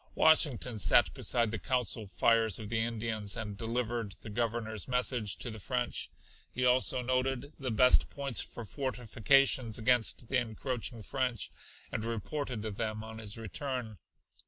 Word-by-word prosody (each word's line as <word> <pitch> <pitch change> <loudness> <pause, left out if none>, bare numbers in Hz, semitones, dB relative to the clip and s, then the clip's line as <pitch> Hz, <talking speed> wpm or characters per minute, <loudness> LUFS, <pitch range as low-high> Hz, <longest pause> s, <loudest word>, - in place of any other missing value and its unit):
Washington 130 -7 +4
sat - - +5
beside 115 -3 +1
the 110 - -3
council 120 -2 +1
fires 115 +1 +3
of 110 -2 -7
the 115 0 0
Indians, 110 -2 -1
and 105 -3 -4
delivered 115 -1 -2
the 110 - -7
Governor's 110 -2 -2
message 125 -4 0
to 120 - -4
the 110 - -8
French. 125 +4 -2 0.4
He 125 - -1
also 125 0 +3
noted 130 +2 -1
the 135 -2 -2
best 125 +3 +5
points 140 -4 -3
for 120 - -7
fortifications 125 0 +2
against 120 0 +2
the 135 - +1
encroaching 120 0 -4
French, 125 -2 -2 0.4
and 110 - -3
reported 115 +1 -3
them 110 0 -3
on 110 0 -9
his 105 -1 -4
return. 115 - -5
115 Hz, 145 wpm, -31 LUFS, 110-125 Hz, 0.4 s, sat